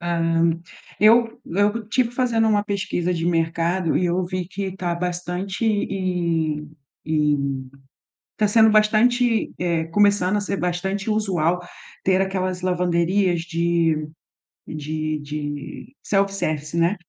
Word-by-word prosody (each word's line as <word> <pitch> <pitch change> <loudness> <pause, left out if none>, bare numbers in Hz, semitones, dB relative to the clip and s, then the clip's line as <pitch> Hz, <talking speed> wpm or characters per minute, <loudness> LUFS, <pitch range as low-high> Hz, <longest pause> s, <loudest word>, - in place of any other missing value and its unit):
Hã, 165 -1 +1 0.5
eu 230 +2 +4
eu 205 +5 +1
estive 235 +3 0
fazendo 235 -3 +1
uma 205 -1 +3
pesquisa 190 -4 -2
de 165 -1 -2
mercado 165 +1 0
e 180 - +1
eu 180 +1 0
vi 185 -1 -4
que 190 0 -5
tá 175 -2 -2
bastante 180 +4 -3
e 175 -7 0 0.4
e 150 -2 +2 1.0
tá 210 -1 +2
sendo 220 +1 +5
bastante 225 +2 +3
eh, 170 -2 0
começando 205 +1 +3
a - - +1
ser 200 -1 -2
bastante 190 +3 -2
usual, 180 -5 +1 0.4
ter 190 0 +2
aquelas 185 -1 -2
lavanderias 180 0 +1
de 170 -2 0 0.6
de 155 0 -3
de 145 - -6
self-service, 185 -6 -1
né. 170 +5 +2
180 Hz, 120 wpm, -22 LUFS, 165-205 Hz, 1.0 s, sendo